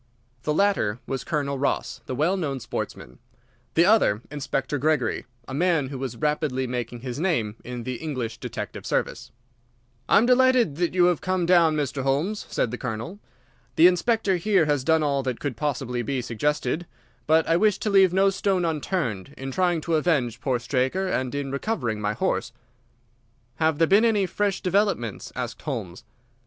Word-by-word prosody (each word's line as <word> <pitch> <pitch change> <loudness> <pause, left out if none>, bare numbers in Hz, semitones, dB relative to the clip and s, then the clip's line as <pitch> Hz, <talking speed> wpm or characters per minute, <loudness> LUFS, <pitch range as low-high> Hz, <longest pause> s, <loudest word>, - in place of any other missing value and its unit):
The 150 - -1
latter 195 - +2
was 135 -1 -3
Colonel 140 -4 -2
Ross, 140 - -1
the 130 - -3
well 160 +8 +2
known 145 -8 -2
sportsman; - - -6 0.6
the 170 - +5
other, 180 - +3
Inspector 145 0 -2
Gregory, 140 -7 0 0.2
a 130 - -7
man 160 -3 +1
who 135 -2 -6
was 130 -3 -4
rapidly 150 -3 0
making 120 -1 -4
his 125 +1 -5
name 120 - 0
in 125 -1 -6
the 125 +1 -4
English 125 -8 -4
detective - - -6
service. - - -2 0.8
"I - - +6
am 220 - +5
delighted 250 - +4
that 175 +1 0
you 180 -1 +5
have 175 -3 +2
come 185 -2 0
down, 170 -3 +4
Mr. 140 -3 -2
Holmes," 145 +11 -1
said 115 - 0
the 125 - -5
Colonel. 125 - -5 0.6
"The 165 - +6
Inspector 195 +2 +3
here 185 -1 +3
has 145 -3 +1
done 160 +2 +3
all 140 -2 +1
that 130 -3 -3
could 140 -4 -3
possibly 125 -2 -2
be 130 +3 -2
suggested, 150 +8 -1 0.4
but 160 0 +4
I 165 - +3
wish 210 +3 +3
to 215 - -2
leave 190 -2 +6
no 195 +2 +3
stone 190 -2 0
unturned 150 - -2
in 135 0 -5
trying 175 0 +1
to 165 0 +1
avenge 130 -8 0
poor 130 0 +1
Straker 130 +9 0
and 130 -4 -1
in 140 -1 -3
recovering 135 - -2
my 105 0 0
horse." 125 - -1 1.1
"Have 160 -1 +2
there 165 - +4
been 200 +7 +4
any 210 -4 +3
fresh 200 +1 -1
developments?" 185 - 0
asked 120 -2 -5
Holmes. 110 - -5
150 Hz, 175 wpm, -25 LUFS, 130-180 Hz, 1.1 s, I